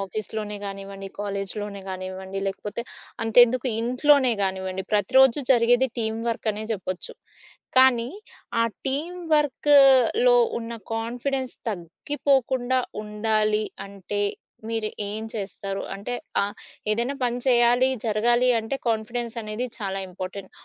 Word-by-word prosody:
ఆఫీస్‌‌లోనే 210 Hz, +1 st, -4 dB
గానివ్వండి, 195 Hz, 0 st, -7 dB
కాలేజ్ 200 Hz, -1 st, -3 dB
లోనే 205 Hz, -1 st, -6 dB
గానివ్వండి 190 Hz, +1 st, -5 dB
లేకపోతే, 205 Hz, +4 st, -4 dB, 0.4 s
అంతెందుకు 245 Hz, +3 st, +5 dB
ఇంట్లోనే 255 Hz, +2 st, +4 dB
గానివ్వండి, 190 Hz, 0 st, -2 dB
ప్రతిరోజు 260 Hz, +6 st, +5 dB
జరిగేది 245 Hz, +1 st, +4 dB
టీమ్ 220 Hz, -1 st, -1 dB
వర్క్ 230 Hz, -1 st, -2 dB
అనే 210 Hz, +1 st, -5 dB
జెప్పొచ్చు. 185 Hz, -3 st, -4 dB, 0.6 s
కానీ, 250 Hz, -2 st, +6 dB, 0.5 s
ఆ -, -, +3 dB, 0.2 s
టీమ్ 310 Hz, +7 st, -2 dB, 0.2 s
వర్క్‌లో 290 Hz, -, +5 dB, 0.2 s
ఉన్న 230 Hz, 0 st, -6 dB, 0.2 s
కాన్ఫిడెన్స్ 250 Hz, +3 st, -3 dB, 0.2 s
తగ్గిపోకుండా 255 Hz, -, 0 dB, 0.2 s
ఉండాలి 215 Hz, 0 st, +1 dB, 0.2 s
అంటే 200 Hz, +1 st, -5 dB, 0.5 s
మీరు 225 Hz, -1 st, -1 dB, 0.2 s
ఏం 215 Hz, +2 st, -4 dB
చేస్తారు? 195 Hz, -2 st, -4 dB
అంటే 200 Hz, +5 st, -5 dB, 0.3 s
ఆ! -, -, +2 dB, 0.5 s
ఏదైనా 235 Hz, +6 st, 0 dB
పని 245 Hz, 0 st, 0 dB
చేయాలి, 245 Hz, +1 st, +5 dB, 0.2 s
జరగాలి 240 Hz, +4 st, +3 dB
అంటే, 225 Hz, +5 st, -3 dB
కాన్ఫిడెన్స్ 230 Hz, +1 st, -2 dB
అనేది 215 Hz, +3 st, -3 dB
చాలా 195 Hz, -3 st, -3 dB
ఇంపార్టెంట్. 185 Hz, +1 st, -7 dB
225 Hz, 110 wpm, -25 LUFS, 200-250 Hz, 0.6 s, కానీ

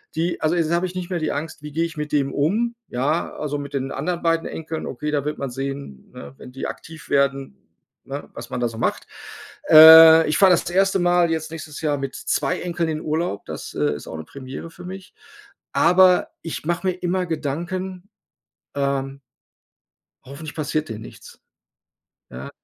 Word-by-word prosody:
die 170 Hz, +2 st, -1 dB
also, 155 Hz, +2 st, +1 dB
jetzt 165 Hz, -2 st, 0 dB
habe 170 Hz, +2 st, +1 dB
ich 180 Hz, -, -10 dB
nicht 180 Hz, -1 st, -5 dB
mehr 180 Hz, -2 st, -2 dB
die 155 Hz, -, -1 dB
Angst, 155 Hz, +1 st, -5 dB
wie 150 Hz, -, -7 dB
gehe 165 Hz, +3 st, 0 dB
ich 165 Hz, -2 st, -8 dB
mit 150 Hz, 0 st, -4 dB
dem 140 Hz, -2 st, 0 dB
um, 215 Hz, +11 st, 0 dB
ja? 145 Hz, +7 st, -1 dB
Also, 145 Hz, -1 st, -3 dB
mit 140 Hz, 0 st, -8 dB
den 135 Hz, -1 st, -2 dB
anderen 170 Hz, +5 st, -3 dB
beiden 165 Hz, 0 st, +1 dB
Enkeln, 160 Hz, 0 st, -6 dB
okay, 150 Hz, +4 st, -4 dB
da 145 Hz, -2 st, -1 dB
wird 150 Hz, -, -3 dB
man 140 Hz, -, -4 dB
sehen, 135 Hz, -, -6 dB
ne, 70 Hz, -1 st, -10 dB
wenn -, -, -12 dB
die 135 Hz, -, -4 dB
aktiv 160 Hz, 0 st, -10 dB
werden, 140 Hz, -1 st, 0 dB, 0.5 s
ne, 140 Hz, +2 st, -7 dB
was 115 Hz, 0 st, -9 dB
man -, -, -4 dB
da 120 Hz, -, +1 dB
so 115 Hz, -1 st, -8 dB
macht. -, -, -1 dB, 0.6 s
Äh, 160 Hz, +1 st, +10 dB
ich 155 Hz, -, +1 dB
fahre 195 Hz, -2 st, +7 dB
das 175 Hz, -, +2 dB
erste 195 Hz, +2 st, +2 dB
Mal 175 Hz, -1 st, +3 dB
jetzt 160 Hz, -1 st, -3 dB
nächstes 155 Hz, -2 st, -8 dB
Jahr 150 Hz, -2 st, 0 dB
mit 135 Hz, -1 st, -5 dB
2 -, -, -1 dB
Enkeln 170 Hz, -2 st, -2 dB
in 155 Hz, -1 st, -2 dB
Urlaub, 155 Hz, -, -2 dB
das, -, -, -7 dB
äh, 75 Hz, 0 st, +1 dB
ist 75 Hz, -, -10 dB
auch -, -, -6 dB
'ne 80 Hz, -, -8 dB
Premiere 135 Hz, -, -9 dB
für 180 Hz, -, -13 dB
mich. 190 Hz, +1 st, -9 dB, 0.6 s
Aber 180 Hz, +1 st, +5 dB
ich 165 Hz, -2 st, -6 dB
mache 175 Hz, +3 st, -1 dB
mir 185 Hz, -, +2 dB
immer 180 Hz, +1 st, -2 dB
Gedanken, 175 Hz, +5 st, -4 dB, 0.7 s
ähm 140 Hz, -1 st, -2 dB, 1.0 s
hoffentlich 145 Hz, +3 st, -9 dB
passiert 155 Hz, 0 st, -2 dB
denen 110 Hz, -1 st, -7 dB
nichts. -, -, -13 dB, 0.9 s
Ja? 65 Hz, +2 st, -8 dB
155 Hz, 190 wpm, -22 LUFS, 140-175 Hz, 1.0 s, Äh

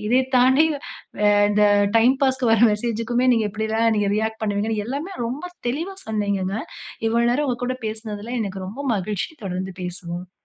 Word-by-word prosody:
இதை 250 Hz, +3 st, +4 dB, 0.2 s
தாண்டி, 260 Hz, +5 st, +5 dB, 0.7 s
அ, -, -, +4 dB, 0.2 s
இந்த 210 Hz, 0 st, +3 dB, 0.3 s
டைம் 250 Hz, +4 st, +4 dB
பாஸ்க்கு 260 Hz, -3 st, +2 dB
வர்ற 225 Hz, +1 st, +6 dB
மெசேஜ்க்குமே, 235 Hz, +3 st, -1 dB
நீங்க 225 Hz, -2 st, +1 dB
எப்படிலாம், 220 Hz, +2 st, +1 dB
நீங்க 205 Hz, -1 st, +1 dB
ரியாக்ட் 220 Hz, +1 st, -2 dB
பண்ணுவீங்கனு, 210 Hz, +1 st, -1 dB
எல்லாமே 290 Hz, +9 st, -4 dB
ரொம்ப 260 Hz, +8 st, -4 dB, 0.2 s
தெளிவா 330 Hz, +10 st, -2 dB
சொன்னீங்கங்க. 200 Hz, -2 st, -1 dB, 0.5 s
இவ்வளவு 235 Hz, +1 st, +2 dB
நேரம் 290 Hz, +4 st, +1 dB
உங்க 250 Hz, -2 st, -1 dB
கூட 255 Hz, +1 st, -1 dB
பேசுனதுல, 215 Hz, 0 st, -6 dB
எனக்கு 195 Hz, -2 st, -4 dB
ரொம்ப 210 Hz, +8 st, -8 dB, 0.2 s
மகிழ்ச்சி 200 Hz, 0 st, -2 dB, 0.2 s
தொடர்ந்து 185 Hz, 0 st, -4 dB
பேசுவோம். 180 Hz, 0 st, -6 dB
220 Hz, 155 wpm, -22 LUFS, 205-245 Hz, 0.7 s, வர்ற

